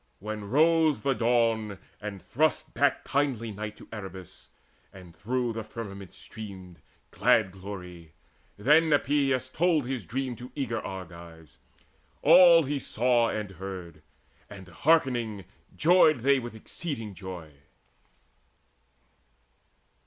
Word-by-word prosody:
When 105 +2 -6
rose 155 -1 +3
the 135 - +2
dawn, 115 -4 +1 0.2
and 105 -3 -7
thrust 155 +3 0
back 145 -1 +1
kindly 135 -6 -1
night 105 +1 -6
To - - -14
Erebus, 95 -4 -10 0.4
and 90 -3 -14
through 120 +6 -2
the 115 0 -5
firmament 100 -6 -9
streamed 95 -5 -10 0.3
Glad 105 -4 +3
glory, 90 -4 -10 0.4
then 150 +9 +4
Epeius 135 -3 +1
told 165 -3 +2
his 125 -3 -3
dream 130 0 -3
To 125 +1 -10
eager 120 -6 -2
Argives 85 -7 -10 0.6
all 170 -2 +8
he 140 0 -2
saw 120 -2 +1
and 105 -2 -4
heard; 90 -4 -8 0.5
And 95 -2 -11
hearkening 120 - +1 0.3
joyed 155 -5 +5
they 140 +2 +4
with 120 -2 -8
exceeding 115 - -6
joy. 90 -4 -9
115 Hz, 115 wpm, -27 LUFS, 95-135 Hz, 0.6 s, all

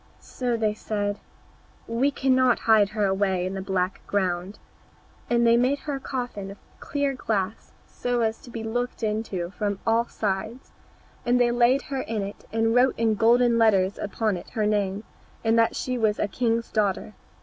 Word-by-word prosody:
So 245 -2 -3
they 215 -2 +1
said, 205 -1 -3 0.7
"We 235 +5 +1
cannot 260 -3 +3
hide 215 -3 +4
her 210 -1 0
away 190 -2 +1
in 185 - -3
the 195 - -4
black 190 -1 -1
ground." 185 0 -1 0.7
And 235 0 +3
they 230 - +5
had 235 - +5
made 275 +3 +1
a 280 -2 -2
coffin 245 -7 -4
of 200 - -9 0.2
clear 285 -1 -1
glass, 220 -5 -3
so 245 -1 -2
as 225 0 0
to - - -13
be 230 -1 -6
looked 245 +2 -3
into 210 -5 -2
from 205 0 -2
all 230 +1 +3
sides, 215 +4 -3 0.5
and 245 0 +2
they 240 -1 +4
laid 245 +3 +3
her 270 -1 -3
in 220 -2 -3
it, 200 +1 -8
and 225 0 +1
wrote 250 +2 +3
in 225 -1 +2
golden 235 +2 +4
letters 200 -4 +3
upon 210 -1 -1
it - - -10
her 220 -3 -1
name, 205 -1 0 0.4
and 225 0 +3
that 230 - +3
she 255 -1 -2
was 215 -2 +2
a - - 0
king's 230 +2 -1
daughter. 210 -1 0
225 Hz, 180 wpm, -25 LUFS, 205-240 Hz, 0.7 s, they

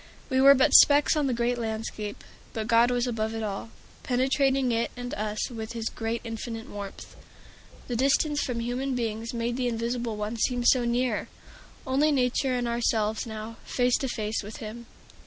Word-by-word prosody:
We 260 0 +3
were 275 +1 +9
but 260 - +3
specks 290 +2 +7
on 295 -2 +1
the - - 0
great 240 +1 0
landscape. 220 -2 -4 0.3
But 220 -1 -3
God 235 +1 +4
was 245 0 +1
above 225 -2 -2
it 225 - -3
all, 205 +1 -4 0.3
penetrating 265 0 +1
it 230 0 0
and 245 0 -5
us 215 +3 -3
with 225 -1 -6
his 230 -1 -3 0.3
infinite 225 0 -6
warmth. 200 -1 -8 0.7
The 245 - -3
distance 280 +4 +2
from 240 -3 -2
human 255 +3 -2
beings 230 -1 -3
made 235 0 -2
the 255 -1 0
Invisible 235 0 -2
One 210 +2 -3
seem 245 +2 0
so 245 0 +4
near! 240 -1 0 0.6
Only 280 +3 +2
Nature 255 -1 +1
and 245 -1 -1
ourselves 225 -2 0
now, 220 +1 -7
face 245 -1 +1
to 270 - -2
face 220 -3 -2
with 210 +1 -8
Him! 230 +2 -8
235 Hz, 175 wpm, -27 LUFS, 225-255 Hz, 0.7 s, were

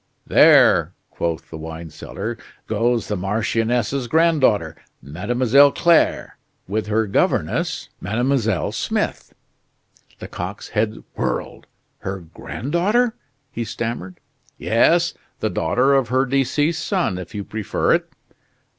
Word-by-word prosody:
"There," - - +5 0.2
quoth 85 -1 -3
the 80 - -7
wine 80 0 -8
seller, 115 +9 -6 0.3
"goes 115 +2 0
the 105 - -2
marchioness's 115 +6 -1
granddaughter, 135 - +2 0.2
Mademoiselle 120 - +3
Claire, 170 +2 +2 0.3
with 105 +3 -2
her 110 +1 +1
governess, 100 - 0
Mademoiselle 115 - 0
Smith." - - -3 0.8
Lecoq's 95 +3 -6
head 105 0 -1
whirled. - - -3 0.3
"Her 95 0 -4
granddaughter!" 175 - -1 0.4
he 120 - -3
stammered. 110 -4 -5 0.4
"Yes - - +3 0.3
the - - -1
daughter 125 +12 +2
of 135 -3 +3
her 130 +3 +2
deceased 140 +4 0
son, 175 - -1
if 90 +4 -9
you 100 - -3
prefer 105 0 0
it." - - -1
115 Hz, 110 wpm, -21 LUFS, 95-135 Hz, 0.8 s, There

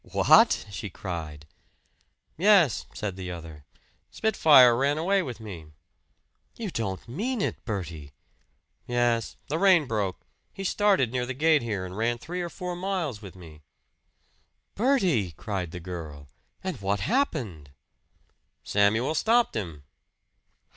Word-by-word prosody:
"What!" - - +4
she 100 +2 -5
cried. 80 -6 -6 0.9
"Yes," 185 - +4
said 100 -4 -4
the 95 -1 -6
other. 80 -4 -9 0.4
"Spitfire 145 - +5
ran 140 +4 +1
away 190 +5 +2
with 125 -9 -6
me." 90 -8 -9 0.9
"You 220 -5 -4
don't 100 - -4
mean 220 - -3
it, - - -2
Bertie!" 85 - -5 0.8
"Yes. 120 -2 0
The 155 +3 -2
rein 185 -6 +5
broke. 105 -6 -3 0.3
He 195 - -6
started 195 - +2
near 125 -1 -2
the 130 - -4
gate 155 +1 +3
here 105 -5 -3
and 90 0 -8
ran 115 +3 0
three 170 +8 -5
or 175 - -3
four 180 +1 -5
miles 175 - -3
with 100 -4 -11
me." 80 -4 -13 1.1
"Bertie!" 185 - +1
cried 95 0 -4
the 90 - -7
girl. 80 -5 -8 0.4
"And 180 - -4
what 100 0 -1
happened?" 125 - -1 0.9
"Samuel 110 +8 +2
stopped 230 +8 +2
him." 85 -9 -5
115 Hz, 130 wpm, -27 LUFS, -, 1.1 s, Spitfire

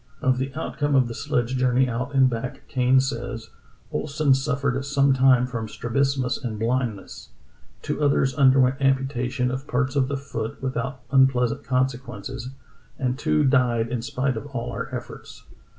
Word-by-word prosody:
Of 130 -3 +1
the 135 +1 -2
outcome 145 -1 -1
of 130 -2 +4
the 115 - -5
sledge 120 +2 -1
journey 130 +1 +3
out 125 +3 -3
and 135 -1 +6
back 125 0 -5
Kane 130 0 +3
says: 120 -4 -4 0.4
"Ohlsen 145 -2 +2
suf 140 +1 -2
fered 135 -1 0
some 140 0 +3
time 130 -1 +4
from 115 -3 -4
strabismus 130 +2 -1
and 115 -4 -3
blindness; 115 -2 -3 0.5
two - - -3
others 140 -2 +2
underwent 135 -1 +4
amputation 135 -2 0
of 130 +2 -5
parts 130 +2 -1
of 135 -2 +2
the 140 +1 -2
foot 115 -5 -5
with 130 -1 -3
out 130 +2 -3
unpleasant 130 -3 +3
consequences; 130 0 -2 0.5
and 130 0 -1
two 150 +1 +2
died 125 -4 +2
in 120 -1 -2
spite 130 +1 -1
of 135 - -6
all 125 -4 -4
our - - -5
efforts. - - -8
130 Hz, 165 wpm, -24 LUFS, 125-135 Hz, 0.5 s, and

